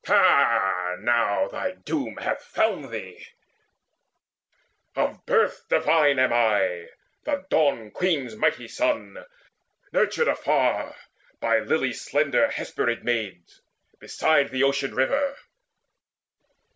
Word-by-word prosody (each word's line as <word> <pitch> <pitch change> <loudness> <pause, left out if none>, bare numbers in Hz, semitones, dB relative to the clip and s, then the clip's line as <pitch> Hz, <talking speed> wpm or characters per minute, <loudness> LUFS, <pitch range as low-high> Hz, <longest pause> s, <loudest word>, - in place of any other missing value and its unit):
Ha, 90 -2 +3
now 115 -1 +1
Thy 280 -1 -4
doom 285 0 -4
hath - - -3
found - - -1
thee! - - -8 1.7
Of - - -2
birth 460 -2 +1
divine 155 - +3
am 130 -1 +3
I, 100 -7 +1 0.4
The 190 0 -3
Dawn 135 -8 +1
queen's 145 -11 -1
mighty 120 +2 0
son, 310 - -2 0.7
nurtured 475 - +1
afar - - 0 0.4
By - - +2
lily - - 0
slender 285 - +1
Hesperid 120 - -2
Maids, 110 -8 -4 0.4
beside 155 -3 +1
The 130 +1 0
Ocean 140 0 0
river. 275 - 0
130 Hz, 100 wpm, -24 LUFS, 110-185 Hz, 1.7 s, Ha